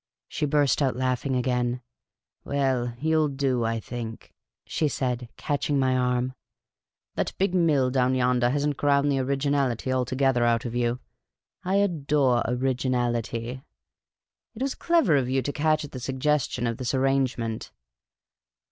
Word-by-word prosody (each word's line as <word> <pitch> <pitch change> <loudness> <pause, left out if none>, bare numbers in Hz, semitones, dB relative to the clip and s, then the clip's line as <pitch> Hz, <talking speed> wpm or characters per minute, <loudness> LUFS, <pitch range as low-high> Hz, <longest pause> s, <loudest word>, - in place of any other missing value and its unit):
She 150 - -2
burst 145 -2 +2
out 130 -4 +1
laughing 130 +1 -1
again. 125 -1 0 0.3
" - - -59
Well, 130 -4 0
3'ou - - -13
'11 155 -3 +2
do, 130 -3 +1
I 115 0 -1
think," 115 -1 -7 0.3
she 155 - 0
said, 125 -4 -2
catching 145 0 -1
my 130 -1 +2
arm. 125 0 0 0.4
" - - -65
That - - -1
big 190 -1 +1
mill 150 -8 +3
down 130 0 +2
yonder 125 -1 +2
has 145 +2 0
n't 145 -2 -1
ground 145 0 +2
the 135 - +1
originality 135 -2 0
altogether 130 0 +1
out 115 0 +2
of 120 - -4
you. 120 0 0 0.6
I 185 +2 0
adore 145 -10 +2
originality. 125 -1 -1 0.9
It 240 - -3
was 275 - -1
clever 330 - +3
of 125 -2 0
you 130 0 +1
to 145 - -2
catch 155 0 +1
at - - -12
the 130 - -6
suggestion 130 0 0
of 115 -1 -1
this 130 0 -2
arrangement. 130 -4 0
130 Hz, 155 wpm, -26 LUFS, 125-145 Hz, 0.9 s, mill